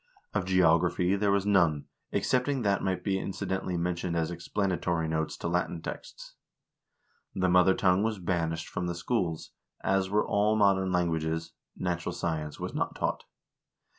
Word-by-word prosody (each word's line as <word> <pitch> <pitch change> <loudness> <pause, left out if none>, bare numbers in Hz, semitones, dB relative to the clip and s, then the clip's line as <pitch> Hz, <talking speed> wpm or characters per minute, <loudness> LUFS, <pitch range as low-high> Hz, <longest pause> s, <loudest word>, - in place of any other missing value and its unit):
Of 105 -3 0
geography 90 0 +3
there 100 0 +1
was 100 0 +2
none, 85 -8 +3 0.3
excepting 130 0 +1
what 100 -1 +2
might 95 -2 -1
be 95 -1 0
incidentally 95 -1 -3
mentioned 85 0 -2
as 80 0 0
explanatory 85 -2 -1
notes 80 0 -2
to - - -4
Latin 85 0 -1
texts. - - -8 1.0
The 95 0 +1
mother 90 +1 +5
tongue 90 0 +3
was 110 0 0
banished 85 -3 -2
from 90 - -3
the 85 - -2
schools, 85 -4 -2 0.3
as 95 0 +1
were 105 +2 +1
all 105 +1 +2
modern 95 -3 +3
languages; 80 -2 -1 0.2
natural 85 -2 -2
science 80 -3 -3
was - - -4
not - - -2
taught. - - -2
90 Hz, 150 wpm, -29 LUFS, 85-95 Hz, 1.0 s, mother